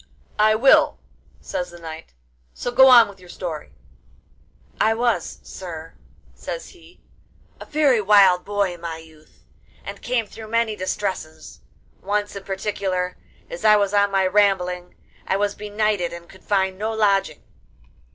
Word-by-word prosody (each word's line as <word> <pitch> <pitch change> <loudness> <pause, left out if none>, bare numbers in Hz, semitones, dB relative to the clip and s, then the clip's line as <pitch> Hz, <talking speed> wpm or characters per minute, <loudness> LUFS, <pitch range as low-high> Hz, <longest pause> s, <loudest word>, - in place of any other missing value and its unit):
'I 215 +1 +5
will,' 265 +5 +4 0.4
says 180 - -4
the 175 - -12
knight, 160 - -10 0.4
'so 245 - -4
go 265 +2 +7
on 240 -3 +8
with 200 -1 -13
your 180 -1 -16
story.' 165 -5 -7 1.0
'I 220 +1 +3
was, 235 0 -1
sir,' 165 -3 -9 0.4
says - - -7
he, 350 -1 -19 0.6
'a - - -9
very 290 -7 +2
wild 195 -3 +5
boy 200 -2 -1
in 175 - -13
my 165 -1 -5
youth, 160 -1 -18 0.4
and - - -8
came 240 -2 -1
through 220 +1 -11
many 230 -1 0
distresses; 185 -4 -5 0.4
once 205 +1 -2
in 200 - -7
particular, 190 -2 -2 0.3
as - - -8
I 215 0 +6
was 200 -1 +1
on 205 0 +3
my 195 -1 +1
rambling, 185 -3 +1 0.3
I 190 - +1
was 205 0 0
benighted 210 -3 -1
and 170 0 -10
could 190 - -17
find 190 -2 0
no 215 +1 -2
lodging. 195 - +1
200 Hz, 150 wpm, -22 LUFS, 180-215 Hz, 1.0 s, on